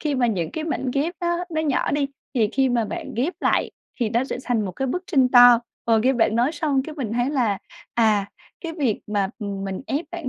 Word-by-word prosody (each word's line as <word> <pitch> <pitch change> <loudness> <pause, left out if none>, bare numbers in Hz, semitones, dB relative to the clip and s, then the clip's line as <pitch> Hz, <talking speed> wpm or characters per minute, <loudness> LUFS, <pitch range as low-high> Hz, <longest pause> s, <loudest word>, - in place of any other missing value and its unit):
khi 300 -2 -1
mà 255 -2 +2
những 180 -8 -1
cái 315 - -4
mảnh 270 -5 -2
ghép 305 +6 0
á, 345 0 0
nó 315 -1 -1
nhỏ 295 -4 0
đi 285 -1 +1 0.3
thì 225 -4 +2
khi 270 0 +2
mà 240 -2 +1
bạn 205 - -6
ghép 275 +10 0
lại - - +1 0.3
thì 225 -3 +1
nó 235 +3 +1
sẽ 265 - -4
thành 245 -4 -1
một 185 - -4
cái 265 +9 -2
bức 360 +8 -2
tranh 265 -7 +3
to. 245 -1 +8 0.3
Ờ, 225 -1 +3
nghe 255 +5 +3
bạn 225 -3 +2
nói 245 +6 +2
xong 290 -3 0
cái 305 +3 -8
mình 250 -8 -4
thấy 245 +3 0
là, 235 -9 +1 0.4
à, 215 -4 +3 0.3
cái 335 -2 -5
việc 275 - -1
mà, 205 -2 0
ừm, 200 -3 -4
mình 195 -1 -4
ép 295 +5 -1
bản 345 -6 -5
250 Hz, 245 wpm, -23 LUFS, 220-290 Hz, 0.4 s, to